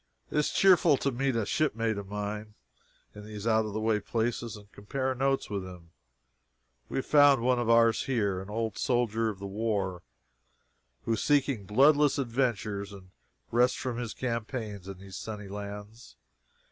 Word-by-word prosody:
It - - -2
is 150 - +1
cheerful 175 -6 +5
to 140 - 0
meet 135 +1 0
a 115 -2 0
shipmate 115 -3 0
in 105 +1 -5 0.6
these 105 0 -8
out 110 -1 +2
of 105 - -6
the 110 - -2
way 110 -1 +1
places 115 +1 -2
and 105 0 -16
compare 130 +6 -3
notes 135 +1 0
with 100 -2 -3
him. 90 -3 -11 1.0
We - - -3
have 135 - -1
found 145 -4 +5
one 125 0 +3
of 120 -1 -1
ours 115 -1 +4
here 100 -8 0
an 95 - -10
old 110 +1 -3
soldier 115 -2 +1
of 105 - -5
the 100 - -8
war, 100 -3 -2 1.0
who 115 - +1
is 110 - -1
seeking 140 -7 +1
bloodless 145 +7 +4
adventures 115 -6 -1
and 95 -2 -13 0.4
rest 125 +2 +3
from 130 -4 -3
his 120 -3 -5
campaigns 115 -5 -4
in 95 -1 -7
these 95 0 -10
sunny 105 -2 -6
lands. 105 +3 -8
110 Hz, 165 wpm, -29 LUFS, 100-125 Hz, 1.0 s, cheerful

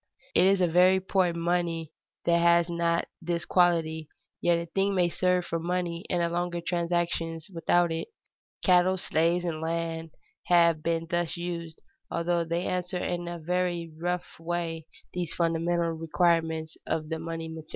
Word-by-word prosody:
It 185 - +5
is 195 -1 +3
a 180 - +4
very 180 +3 +5
poor 190 -1 +1
money 170 -1 -1 0.3
that 170 0 +4
has 170 0 +4
not 170 0 +1 0.2
this 170 0 -2
quality, 160 -3 +2 0.3
yet 175 -1 +3
a 170 - -3
thing 195 +4 0
may 175 -2 +3
serve 180 0 +1
for 165 - -2
money 175 0 -2
in 175 - +1
larger 175 0 -1
transactions 170 0 -1
without 170 +1 +2
it. 165 - -3 0.6
Cattle, 185 0 +4
slaves, 170 +1 +1
and 160 -2 -3
land 165 0 -2 0.4
have 170 -3 +4
been 165 0 -1
thus 175 0 -1
used, 170 -2 -5 0.3
although 170 0 0
they 170 +1 -2
answer 180 0 -2
in 175 -1 -2
a 175 0 -4
very 175 0 -1
rough 175 +2 -3
way 165 -1 -3 0.3
these 175 -2 -3
fundamental 170 0 +1
requirements 160 -1 0
of 155 -1 -2
the 160 -1 -2
money 165 0 -5
material. 160 -1 -9
170 Hz, 155 wpm, -28 LUFS, 165-175 Hz, 0.6 s, It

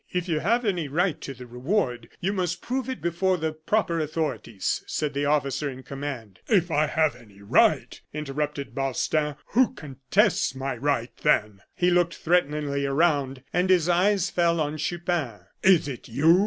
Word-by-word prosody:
"If 180 0 -2
you 160 -3 0
have 230 +8 +1
any 180 -7 0
right 170 +3 0
to 135 - -6
the 125 0 -10
reward, 125 - -1
you 195 +3 -1
must 180 -2 -2
prove 265 +1 -2
it 260 - -5
before 180 +2 +1
the 160 -1 -1
proper 170 +2 0
authorities," 150 -9 -2
said 150 -1 -2
the 140 +1 -1
officer 145 0 +1
in 130 -1 -9
command. 135 -8 -6
"If 180 -6 +2
I 155 0 +3
have 155 0 +1
any 100 -3 -17
right!" 100 - +2
interrupted 150 -1 -4
Balstain; 145 +2 0
"who 255 +3 +3
contests 145 - +1
my 135 0 -3
right, 125 -1 -1
then?" 105 -9 +1
He 180 0 +2
looked 175 -1 +2
threateningly 150 -4 0
around, 140 -2 +1
and 180 +1 +1
his 180 -3 +4
eyes 185 +2 +2
fell 170 -1 +2
on 150 0 -1
Chupin. 170 - -2 0.2
"Is 185 -6 +5
it 130 -4 -7
you?" 155 +9 +4
155 Hz, 170 wpm, -26 LUFS, 135-175 Hz, 0.2 s, Is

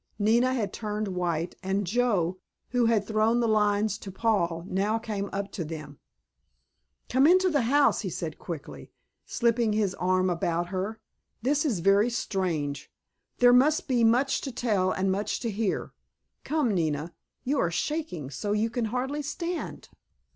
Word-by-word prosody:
Nina 235 +5 +3
had 210 -6 -2
turned 210 -1 -3
white, 175 -2 -2
and 195 +1 -1
Joe, 190 -4 +1 0.3
who 245 -1 +2
had 220 -3 +2
thrown 220 +2 +2
the 235 - +2
lines 210 -1 +2
to 195 - -8
Paul, 180 -5 0
now 200 +4 0
came 210 -3 -4
up 200 0 -4
to 175 - -4
them. 155 -2 -8 1.1
"Come 265 +3 +4
into 370 +1 +5
the 290 -3 +2
house," 280 +5 +3
he 195 - -3
said 165 -1 -5
quickly, 160 -4 -8 0.4
slipping 235 -2 +1
his 210 -3 +1
arm 185 0 +1
about 175 0 -1
her. 195 +4 -3 0.4
"This 290 +4 +1
is 220 - 0
very 200 +5 +4
strange. 165 - -2 0.5
There 245 0 +6
must 290 +5 +4
be 245 -4 +2
much 245 +5 +3
to 270 - -4
tell 210 -6 +1
and 190 0 0
much 205 +2 -1
to 230 - -2
hear. 210 -1 -2 0.5
Come, 290 -8 +1
Nina, 160 -2 -1 0.3
you 275 +2 0
are 170 - +2
shaking 175 - -3
so 205 +9 -2
you 220 +2 0
can 240 -1 -1
hardly 255 +6 -2
stand." 335 +4 -5
210 Hz, 160 wpm, -27 LUFS, 185-245 Hz, 1.1 s, There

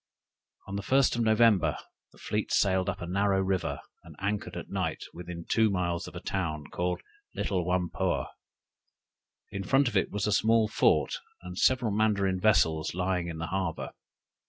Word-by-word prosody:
"On 100 0 -4
the - - -2
first 135 +4 +3
of 120 - 0
November, 110 -5 +4 0.3
the - - -21
fleet - - -3
sailed 95 -2 +2
up - - -4
a - - -3
narrow 100 +2 +1
river, 95 -1 -1 0.2
and - - -13
anchored 100 -3 -2
at 90 - -8
night 90 -5 -2
within 85 -1 -8
two 110 -1 +3
miles 85 -3 -1
of - - -11
a - - -4
town 80 -6 -3
called 90 0 -2 0.3
Little 95 -4 -1
Whampoa. 90 -1 0 1.3
In 100 0 -4
front 135 +7 +3
of 120 - -3
it - - +2
was 105 -1 -2
a 105 - 0
small 110 +1 +3
fort, - - +2 0.3
and 90 0 -7
several 125 +2 +2
Mandarin 100 -3 +1
vessels 80 -7 +2
lying 90 -1 0
in 85 -1 -5
the 80 - -3
harbor. 95 -4 -2
95 Hz, 170 wpm, -29 LUFS, 90-105 Hz, 1.3 s, November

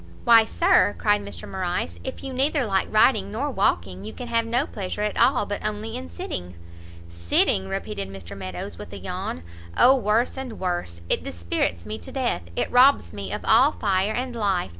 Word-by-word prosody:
"Why, 230 -2 +7
Sir," 345 - +3
cried 205 -1 +2 0.2
Morrice, 175 - -3
"if - - -6
you 270 - -5
neither 275 +1 +1
like 195 -3 0
riding 215 -2 +3
nor 275 +7 -2
walking, 95 - 0
you 110 - -7
can 245 - -8
have 230 -1 +1
no 245 +5 +1
pleasure 200 -3 -4
at 210 - -1
all 250 -5 +3
but 205 0 -4
only 215 +1 -3
in 85 0 -6
sitting." 90 +1 -6 0.5
"Sitting!" 85 +2 +1
repeated 95 0 -4
Mr 95 -3 -9
Meadows, 95 -2 -7
with - - -9
a - - -6
yawn, 85 - -5 0.3
"O 260 +2 +7
worse 230 +1 +1
and 255 -5 -7
worse! 175 - -3
it - - +1
dispirits 85 0 -2
me 105 +1 -5
to - - -11
death! 260 - -1
it - - -1
robs 260 +3 +5
me - - -6
of - - -5
all 290 +4 +5
fire 195 0 0
and 250 0 -3
life! 195 - 0
205 Hz, 185 wpm, -24 LUFS, -, 0.5 s, Why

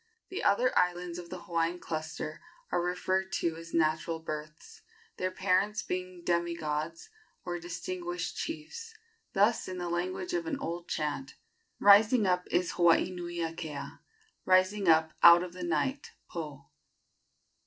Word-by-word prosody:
The 375 - -4
other 250 +5 +3
islands 180 -1 +1
of 170 -1 -9
the 180 -1 -7
Hawaiian 170 0 0
cluster 155 -2 -5 0.3
are - - +2
referred 185 +2 -1
to 165 -1 0
as 165 0 -10
natural 160 +1 +1
births, 155 - -8 0.4
their 185 - 0
parents 190 +3 +1
being 180 -1 -5
demi 170 0 +1
gods 155 - -4 0.3
or 175 -1 -3
distinguished 175 +1 -4
chiefs. 335 +9 -6 0.4
Thus, 205 +4 +3
in 185 -1 -5
the 175 -1 -3
language 185 - -2
of 345 -1 -1
an 295 -4 -1
old 170 -10 -5
chant: 145 -3 -3 0.4
"Rising 210 +3 +6
up 180 -1 +1
is 180 -1 +1
Hawaii 170 +1 +4
nui 175 -1 -5
akea! 155 -4 -5 0.4
Rising 185 +2 +3
up 160 -1 +5
out 170 +1 +9
of 180 -1 -7
the 180 - -8
night 175 - -1 0.2
(Po)! 150 -5 -7
175 Hz, 145 wpm, -30 LUFS, 165-190 Hz, 0.4 s, out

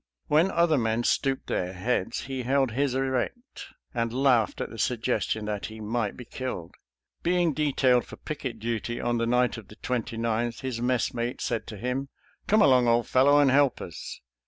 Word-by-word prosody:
When 155 +5 +3
other 170 -5 +3
men 110 0 0
stooped 135 +2 +1
their 90 +1 -2
heads 95 +2 -1
he 130 -1 -4
held 135 0 +1
his 135 +2 0
erect, 135 - -2 0.3
and 115 -2 -1
laughed 125 -3 +2
at - - -4
the 115 - -9
suggestion 115 -2 0
that 105 -1 -3
he 110 0 -10
might 110 0 -2
be 125 - -9
killed. 120 -9 -5 0.5
Being 175 -2 +2
detailed 135 -4 +2
for - - -9
picket 140 -6 -5
duty 115 +1 -3
on 120 -1 0
the 115 - 0
night 125 0 +2
of 105 - -14
the 105 - -13
29th, 115 0 -2
his 130 -3 -3
messmate 120 -1 -1
said 120 -3 -2
to 105 - -7
him, 125 +5 -3 0.2
" - - -36
Come 215 0 +5
along, 125 -5 +5
old 115 0 +3
fellow, 140 +3 +5
and 140 -2 +5
help 140 -1 +3
us." 85 - -7
125 Hz, 180 wpm, -27 LUFS, 115-135 Hz, 0.5 s, Come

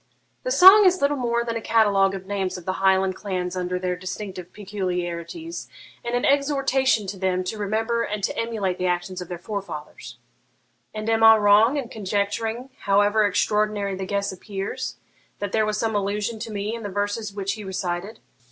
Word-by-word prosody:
'The - - -3
song 410 -2 +9
is 370 -1 +4
little 285 +1 +2
more 235 -3 0
than 230 -1 -3
a 230 - -3
catalogue 200 -4 +3
of 190 -1 -8
names 190 -2 -2
of 180 - -11
the 185 - -1
Highland 190 -1 +3
clans 185 -2 -3
under 180 0 -2
their 180 0 -2
distinctive 185 0 -7
peculiarities, 190 - -5 0.3
and 235 +1 -2
an 245 - 0
exhortation 270 -5 +2
to 190 0 -6
them 185 -1 0
to 215 +4 -4
remember 225 +3 0
and 210 -2 -3
to - - -1
emulate 215 -6 -2
the 180 - 0
actions 180 +1 -2
of 180 - -7
their 175 - -5
forefathers.' 190 -5 -7 0.7
'And 215 0 -6
am 225 0 +2
I 225 0 +9
wrong 215 +6 +5
in 270 -4 -3
conjecturing, 220 +4 -2
however 205 +1 +3
extraordinary 210 0 0
the 190 0 -5
guess 200 0 -1
appears, 195 +1 -5 0.4
that 205 -1 -4
there 215 0 +2
was 210 0 -1
some 225 0 -1
allusion 205 +2 -1
to 225 0 -6
me 205 +1 -3
in 230 - -5
the 205 - -5
verses 205 +2 -2
which 200 0 -3
he 215 -1 -8
recited?' 190 +1 -4
205 Hz, 185 wpm, -24 LUFS, 190-225 Hz, 0.7 s, song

